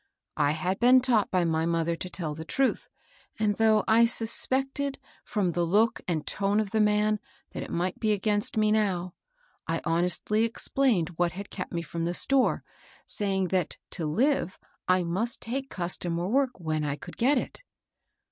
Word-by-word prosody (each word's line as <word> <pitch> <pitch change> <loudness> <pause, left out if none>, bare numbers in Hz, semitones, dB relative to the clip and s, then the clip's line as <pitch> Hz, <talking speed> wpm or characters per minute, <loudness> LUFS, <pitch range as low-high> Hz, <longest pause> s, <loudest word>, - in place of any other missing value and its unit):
I 145 -1 +2
had 180 +5 -2
been 250 +2 +6
taught 245 -5 +2
by 180 -2 +1
my 160 0 0
mother 165 0 0
to 180 +2 -6
tell 165 -5 -4
the 160 +1 -7
truth; 270 +10 0 0.5
and 215 -1 +1
though 220 -1 +4
I 230 +1 +6
suspected 270 +5 +1 0.3
fi 210 - -3
om 180 -3 +1
the 175 +1 0
look 215 +7 +2
and 160 -4 -1
tone 200 +1 0
of 210 -3 -2
the 220 - +2
man 210 0 +2 0.3
that - - -6
it - - -7
might 180 +2 -2
be 215 -2 +1
against 210 +3 0
me 215 -1 +3
now, 185 -5 0 0.5
I - - 0
honestly 180 +6 +1
explained 230 - +1
what 175 -1 +1
had 200 +2 -8
kept 185 - -6
me 170 -1 -3
from 165 +1 -4
the 175 +1 -2
store, 275 +5 +2 0.4
saying 190 -3 0
that 180 -3 -1
to 165 -5 -3
live. 230 - +1 0.3
I 185 0 +3
must 195 +8 -1
take 265 +3 -4
customer 175 -1 -2
work 255 0 0
when 155 -2 -2
I 145 -1 -1
could - - -11
get 265 +4 +3
it. 250 - -4
200 Hz, 180 wpm, -27 LUFS, 170-225 Hz, 0.5 s, been